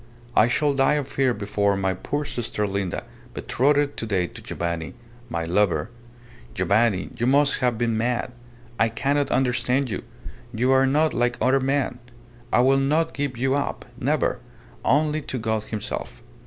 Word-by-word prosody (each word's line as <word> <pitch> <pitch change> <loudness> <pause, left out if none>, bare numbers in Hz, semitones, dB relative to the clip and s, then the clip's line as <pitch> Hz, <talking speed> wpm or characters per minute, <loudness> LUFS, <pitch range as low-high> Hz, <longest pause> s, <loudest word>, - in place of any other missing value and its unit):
I 110 - +6
shall 145 +4 +2
die 135 +2 +3
of 145 -3 -2
fear 135 -2 +1
before 100 -2 0
my 95 -1 0
poor 145 +10 -3
sister 115 -6 -2
Linda, 95 -3 -2 0.3
betrothed 145 +2 +1
to - - -2
day 95 -4 +1
to - - -10
Giovanni 85 -2 -4 0.3
my 85 -1 -2
lover! 90 0 +1 0.6
Giovanni, 100 +1 +2
you 120 0 0
must 140 +2 +4
have 125 -3 +1
been 115 -1 0
mad! 120 +2 -1 0.5
I 115 - +4
cannot 140 +5 0
understand 125 0 +1
you! 95 - -3 0.5
You 125 +4 +2
are 135 0 +5
not 155 +4 +2
like 120 0 +1
other 130 +2 +3
men! 135 -2 0 0.5
I - - +4
will 135 +2 +4
not 150 +4 +1
give 140 -4 -3
you 130 +2 +1
up 140 0 -2
never - - 0 0.4
only 150 +2 +2
to 135 - -5
God 110 -2 -1
himself! 100 - -5
125 Hz, 160 wpm, -24 LUFS, 105-135 Hz, 0.6 s, I